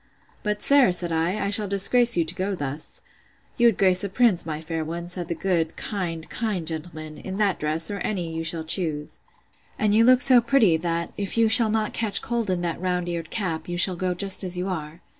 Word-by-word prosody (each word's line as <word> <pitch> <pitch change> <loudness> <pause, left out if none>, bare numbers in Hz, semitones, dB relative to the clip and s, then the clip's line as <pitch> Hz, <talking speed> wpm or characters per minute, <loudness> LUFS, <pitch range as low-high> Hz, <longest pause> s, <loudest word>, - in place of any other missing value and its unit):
But, 210 -1 -3
sir, 280 -8 +4
said 175 -1 +2
I, 165 +5 -1
I - - -1
shall 205 0 +3
disgrace 235 +4 +5
you 170 - +2
to 160 - 0
go 190 +2 -3
thus. 145 -1 -7 0.5
You 240 -2 +4
would 225 - +2
grace 185 -1 +3
a 200 - -3
prince, 200 -5 +2
my 155 -1 -4
fair 160 0 -4
one, 170 +2 -6
said 175 -1 -6
the 170 - -3
good, 170 -4 -1
kind, 170 -6 -5
kind 205 -4 -3
gentleman! 155 -1 -6
in 190 0 -7
that 205 -3 0
dress, 155 +5 -1
or 200 - -5
any 175 -6 -3
you 165 - -3
shall 160 0 0
choose: 160 -3 -1 0.6
And 210 -1 +1
you 220 +2 +5
look 255 +1 +5
so 255 -3 +5
pretty, 235 -7 +3
that, 170 0 -3
if 200 +2 -3
you 225 -1 +3
shall 225 0 +7
not 215 0 -1
catch 215 -4 -1
cold 235 -3 -2
in 180 -1 -1
that 170 -1 -4
round 180 -1 -2
eared 165 -2 -5
cap, 170 -6 -4
you 175 - -4
shall 180 +1 0
go 180 0 -2
just 195 +2 +1
as 180 -1 0
you 180 +1 -3
are. 160 -3 -6
180 Hz, 225 wpm, -23 LUFS, 165-210 Hz, 0.6 s, shall